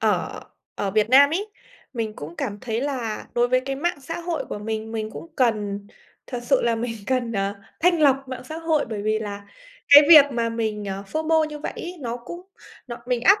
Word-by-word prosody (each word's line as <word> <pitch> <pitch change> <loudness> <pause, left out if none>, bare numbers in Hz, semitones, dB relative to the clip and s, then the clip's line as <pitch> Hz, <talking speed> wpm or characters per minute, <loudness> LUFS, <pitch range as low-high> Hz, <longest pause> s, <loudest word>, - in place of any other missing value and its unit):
ở - - 0 0.3
ở 195 - -2
Việt 215 +3 +1
Nam 280 +2 +7
ấy, 390 +6 -1 0.5
mình 225 -3 -3
cũng 155 +4 -8
cảm 205 0 -4
thấy 230 -2 -2
là 255 -6 -3
đối 240 0 +2
với 255 0 +3
cái 270 +1 -4
mạng 340 0 -2
xã 330 +6 -6
hội 340 -2 -3
của - - -5
mình, 220 +1 -4
mình 220 -1 -3
cũng 330 - -9
cần 205 -5 0 0.4
thật 245 - -5
sự 265 +1 +2
là 235 -1 +2
mình 230 0 -3
cần, 250 -3 0
ờ, 200 -1 -1 0.3
thanh 345 0 +3
lọc 270 -1 +3
mạng 260 - -6
xã 315 +5 -7
hội 320 -2 +1
bởi 210 -2 -4
vì 215 0 +1
là 205 -1 -6 0.4
cái 285 +1 +10
việc 305 -4 +10
mà 235 -1 0
mình, 220 -2 -3
ờ, 195 0 -4
FOMO 315 +4 +1
như 300 -1 -6
vậy - - -5
ấy, 355 +1 -6
nó 240 -2 -3
cũng 295 +9 -9 0.5
nó 240 - -6
mình 250 -2 0
áp 395 +6 +6
245 Hz, 220 wpm, -23 LUFS, 215-290 Hz, 0.5 s, cái